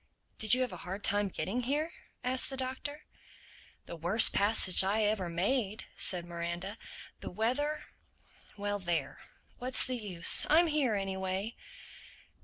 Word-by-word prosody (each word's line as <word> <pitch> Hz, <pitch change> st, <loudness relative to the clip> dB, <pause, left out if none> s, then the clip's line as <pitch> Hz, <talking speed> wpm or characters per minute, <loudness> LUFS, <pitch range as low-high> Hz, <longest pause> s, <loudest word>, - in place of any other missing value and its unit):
"Did 220 Hz, +2 st, +6 dB
you 255 Hz, -, -2 dB
have 250 Hz, -6 st, -3 dB
a -, -, -8 dB
hard 190 Hz, +4 st, -8 dB
time 205 Hz, 0 st, +2 dB
getting 200 Hz, +5 st, -4 dB
here?" 295 Hz, +6 st, -2 dB, 0.3 s
asked 255 Hz, +1 st, 0 dB
the 270 Hz, -, -6 dB
Doctor. 265 Hz, +3 st, -5 dB, 0.8 s
"The -, -, -9 dB
worst 175 Hz, +7 st, +5 dB
passage 200 Hz, -3 st, +4 dB
I 205 Hz, +3 st, 0 dB
ever 205 Hz, -4 st, -1 dB
made," 205 Hz, +5 st, -2 dB
said 175 Hz, -2 st, 0 dB
Miranda. 175 Hz, +4 st, -6 dB, 0.4 s
"The -, -, -8 dB
weather—Well 225 Hz, -4 st, -6 dB
there. 175 Hz, -3 st, -4 dB, 0.4 s
What's 255 Hz, +1 st, +4 dB
the 255 Hz, -1 st, -3 dB
use? 185 Hz, -7 st, +4 dB
I'm 330 Hz, +3 st, +4 dB
here 295 Hz, -8 st, 0 dB
anyway." 190 Hz, +2 st, -4 dB
210 Hz, 135 wpm, -30 LUFS, 190-255 Hz, 0.8 s, Did